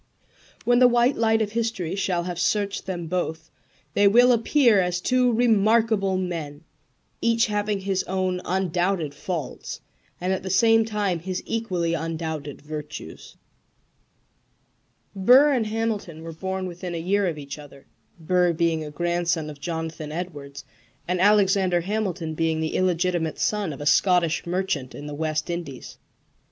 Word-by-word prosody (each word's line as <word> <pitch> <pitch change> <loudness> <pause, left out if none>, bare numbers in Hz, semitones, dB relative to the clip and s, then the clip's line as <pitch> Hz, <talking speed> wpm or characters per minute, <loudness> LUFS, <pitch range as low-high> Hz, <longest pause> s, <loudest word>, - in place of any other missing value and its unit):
When 245 0 +4
the 250 - +8
white 240 +2 +3
light 225 -1 +2
of 210 - -4
history 225 -7 -2
shall 185 -3 0
have 175 -1 -5
searched 200 +3 0
them 175 -3 -3
both 160 -2 -3 0.4
they 205 +4 +4
will 245 +5 +6
appear 235 -1 +4
as 180 0 -1
two 250 +4 +2
remarkable 220 -3 +3
men, 165 -5 -4 0.6
each 230 0 +3
having 210 -1 -1
his 190 -1 0
own 185 -1 -1
undoubted 180 -3 0
faults 155 -1 -5 0.4
and 185 +2 0
at 190 - -2
the 190 - -5
same 225 +4 +4
time 205 -5 -1
his 185 +2 -4
equally 185 -7 -1
undoubted 160 -3 -4
virtues. 150 - -8 1.8
Burr 255 +9 +6
and 235 -5 0
Hamilton 215 -7 -3
were 165 0 -7
born 190 +3 -4
within 175 0 -6
a - - -2
year 195 +4 +1
of 165 -3 -3
each 140 0 -7
other 140 -2 -14 0.3
Burr 180 +1 +2
being 165 -1 0
a 150 - -6
grandson 170 0 -1
of 145 - -13
Jonathan 160 -2 -4
Edwards, 145 -5 -6 0.4
and 180 0 0
Alexander 195 -3 +4
Hamilton 185 -4 -2
being 160 0 0
the 160 0 -2
illegitimate 175 -3 0
son 210 -5 0
of 140 - -8
a - - -5
Scottish 175 0 +3
merchant 170 -7 -2
in 145 - -8
the 150 - -6
West 155 0 -2
Indies. 165 -7 -7
180 Hz, 150 wpm, -24 LUFS, 160-205 Hz, 1.8 s, the